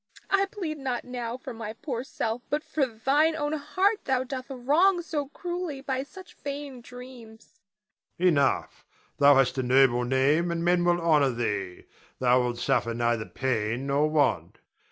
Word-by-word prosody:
I 395 0 +3
plead 340 -7 -5
not 255 -3 -3
now 245 -1 -5
for 260 -1 -8
my 225 -1 -6
poor 245 0 -5
self, 230 -2 -3
but 295 +1 -1
for 280 -4 0
thine 275 +8 +1
own 295 -1 -2
heart 370 +8 0
thou 260 -1 +1
doth 260 0 -6
wrong 310 +9 +2
so 295 -4 -3
cruelly 345 -1 -5
by 265 -1 -2
such 370 +6 -12
vain 280 -3 -7
dreams. 240 -3 -13 0.6
Adrian. 180 0 +3
Enough. 140 - 0 0.4
Thou 145 0 +7
hast 135 0 +2
a - - +2
noble 125 -1 +4
name 135 +7 +2
and 170 0 -2
men 175 0 +3
will 175 0 +2
honor 155 -5 +3
thee, 105 -7 -3 0.3
thou 125 0 +3
wilt 120 -1 -2
suffer 115 -1 0
neither 120 -2 0
pain 120 -1 -2
nor 140 +2 +1
want. 150 -2 +1
230 Hz, 165 wpm, -27 LUFS, -, 0.6 s, Thou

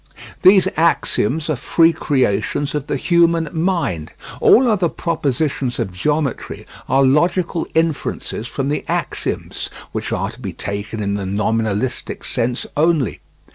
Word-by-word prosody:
These 190 0 +6
axioms 160 -3 +2
are 155 - 0
free 165 +6 +3
creations 130 0 0
of 150 -1 -3
the - - -1
human 170 +1 +3
mind. 160 - -1 0.3
All 255 +1 +6
other 195 -7 +2
propositions 145 -6 -1
of 95 - -3
geometry 145 +7 -2 0.2
are 135 +1 +4
logical 170 +5 +1
inferences 155 -7 -1
from 135 +3 -3
the 150 - -1
axioms - - -3 0.2
(which - - -4
are - - -1
to - - -14
be - - -5
taken 100 +2 -4
in 100 0 -1
the 100 -1 -3
nominalistic 110 +3 -1
sense 120 0 -1
only). 155 -5 +1
145 Hz, 135 wpm, -19 LUFS, 115-165 Hz, 0.3 s, These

